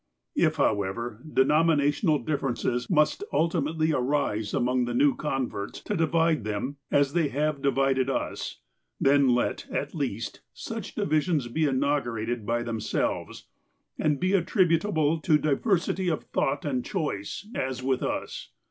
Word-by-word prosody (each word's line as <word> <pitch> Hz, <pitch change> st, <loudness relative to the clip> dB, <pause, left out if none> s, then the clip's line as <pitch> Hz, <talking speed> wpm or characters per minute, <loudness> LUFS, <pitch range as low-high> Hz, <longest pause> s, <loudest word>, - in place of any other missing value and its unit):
" -, -, -56 dB
If, -, -, -2 dB
however, 105 Hz, +4 st, -1 dB
denominational 150 Hz, +2 st, +3 dB
differences 125 Hz, -3 st, -1 dB
must 150 Hz, -, +2 dB
ultimately 160 Hz, -1 st, +1 dB
arise 125 Hz, -6 st, 0 dB
among 125 Hz, 0 st, +1 dB
the 120 Hz, 0 st, -3 dB
new 140 Hz, +3 st, +4 dB
converts, 130 Hz, -8 st, -3 dB
to 210 Hz, -, -3 dB
divide 165 Hz, -, +2 dB
them, 110 Hz, +7 st, -3 dB
as 140 Hz, -1 st, +2 dB
they 165 Hz, -3 st, +2 dB
have 145 Hz, +1 st, -1 dB
divided 135 Hz, -1 st, +2 dB
us, 135 Hz, -, -3 dB, 0.4 s
then 135 Hz, -2 st, +4 dB
let, 120 Hz, -, -1 dB
at -, -, -3 dB
least, 115 Hz, -8 st, -3 dB
such -, -, -6 dB
divisions 155 Hz, -4 st, +1 dB
be 155 Hz, +6 st, +1 dB
inaugurated 120 Hz, -5 st, -1 dB
by 120 Hz, +1 st, 0 dB
themselves, 115 Hz, -2 st, -2 dB, 0.5 s
and 150 Hz, -2 st, +1 dB
be 185 Hz, +1 st, +1 dB
attributable 165 Hz, -3 st, +2 dB
to 155 Hz, -1 st, +3 dB
diversity 175 Hz, +5 st, 0 dB
of 160 Hz, -, -1 dB
thought 140 Hz, +2 st, -1 dB
and 130 Hz, -4 st, -1 dB
choice, 155 Hz, -, -3 dB
as 130 Hz, -1 st, -3 dB
with 130 Hz, -1 st, +1 dB
us. -, -, -4 dB
140 Hz, 135 wpm, -27 LUFS, 125-155 Hz, 0.5 s, new